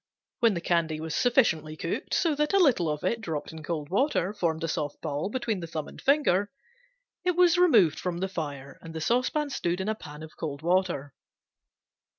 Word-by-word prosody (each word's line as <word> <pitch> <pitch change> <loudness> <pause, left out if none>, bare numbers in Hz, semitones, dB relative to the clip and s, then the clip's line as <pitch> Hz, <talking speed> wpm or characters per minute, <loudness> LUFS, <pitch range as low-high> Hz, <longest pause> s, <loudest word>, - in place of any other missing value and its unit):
When 230 -5 +4
the 170 - -3
candy 165 -3 0
was 160 -1 -4
sufficiently 160 - +2
cooked, - - -3
so 330 -4 +2
that 300 +3 0
a - - +5
little 255 - +4
of 150 0 -3
it, 230 -1 0
dropped 160 -7 -4
in 160 0 -9
cold 155 -2 -4
water, 205 - +1
formed 165 -5 -1
a - - 0
soft 145 -2 -3
ball 155 +3 -3
between 225 -4 -2
the 170 - -6
thumb 160 -2 -4
and - - -12
finger, 265 -9 +3 0.7
it 360 -1 +1
was 355 -1 +5
removed 215 - +5
from 180 -2 -3
the 190 +2 -1
fire 145 -7 -6
and 165 0 -10
the - - -3
saucepan 255 - +1
stood 175 -7 -1
in 190 - -3
a 220 - +1
pan 150 -7 -10
of 160 - -11
cold 145 -1 -5
water. 170 -6 0
175 Hz, 200 wpm, -27 LUFS, 155-235 Hz, 0.7 s, a